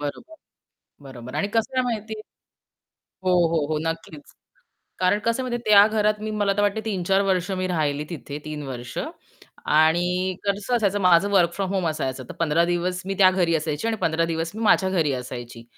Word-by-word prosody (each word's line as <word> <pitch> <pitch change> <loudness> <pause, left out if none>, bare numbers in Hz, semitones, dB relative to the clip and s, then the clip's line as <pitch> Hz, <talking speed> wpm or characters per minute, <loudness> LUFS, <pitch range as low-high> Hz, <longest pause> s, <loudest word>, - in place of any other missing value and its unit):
बरोबर. 145 - -6 0.7
बरोबर. 125 -2 -9
आणि 200 - 0
कसं 230 +3 0
आहे 255 - +3
माहिती 220 -3 -3 1.1
हो, 185 - +2 0.2
हो, 165 - +2
हो, 155 -1 0
नक्कीच. 165 -2 -6 0.7
कारण 185 +3 +2
कसं 230 +3 0
म्हणजे 245 -1 -2
त्या 205 -1 +7
घरात 215 -1 +1
मी, 215 0 -3
मला 200 -1 +2
तर - - +3
वाटते, 205 +1 +1
3-4 195 -2 +1
वर्षं 185 0 0
मी 185 0 -1
राहिली 150 -5 -1
तिथे. 145 -4 -7
3 150 -1 -5
वर्षं. 125 -2 -5 0.6
आणि 160 +3 +3 0.4
कसं 200 +4 0
असायचं, 205 -3 +1
माझं 180 +2 +4
वर्क 175 -4 +4
फ्रॉम 195 0 -3
होम 185 -3 0
असायचं. 135 -4 -3
तर - - -6
15 165 0 +2
दिवस 175 +1 -1
मी 195 - -2
त्या 190 -2 +7
घरी 175 -3 +1
असायची 155 +4 -2
आणि 225 -1 -1
15 165 +1 +1
दिवस 165 +1 -3
मी 220 - -5
माझ्या 195 -3 +4
घरी 165 -6 +1
असायची. 120 -2 -7
180 Hz, 185 wpm, -23 LUFS, 155-205 Hz, 1.1 s, त्या